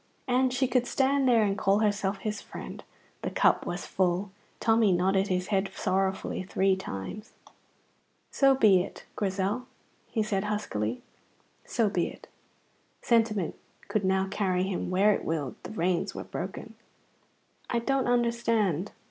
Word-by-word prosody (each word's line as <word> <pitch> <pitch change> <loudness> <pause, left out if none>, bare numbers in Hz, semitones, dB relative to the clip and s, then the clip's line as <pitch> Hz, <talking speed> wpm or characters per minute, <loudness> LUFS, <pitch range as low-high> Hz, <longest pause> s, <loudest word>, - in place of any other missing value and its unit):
And 255 0 +3
she 255 +1 +1
could 245 -1 +1
stand 275 0 +2
there 230 -3 +5
and 200 -1 +1
call 200 -1 +2
herself 205 -2 +1
his 210 +2 -4
friend. - - -9 0.4
The - - -2
cup - - +2
was - - -4
full. 185 +1 0 0.3
Tommy 225 -2 +4
nodded 190 +2 +2
his 180 0 -1
head 195 -1 +1
sorrowfully 190 -1 -1
three 190 +1 +1
times. 190 - -7 1.0
"So 275 -1 +4
be 205 -8 +5
it, 195 - -8
Grizel," 200 +5 -1 0.4
he 220 - 0
said 205 -1 -1
huskily; 125 - -2 0.6
"so 230 -3 +1
be 180 -4 0
it!" - - -11 0.8
Sentiment 220 -6 +2 0.4
could 215 - 0
now 190 0 +2
carry 190 -2 0
him 190 -2 -2
where 195 +3 +4
it - - -3
willed. 150 -5 -2
The - - -8
reins 180 -4 -1
were - - -4
broken. - - -6 1.0
"I 240 - +1
don't 265 +2 0
understand." 230 -7 +1
200 Hz, 145 wpm, -28 LUFS, 190-230 Hz, 1.0 s, there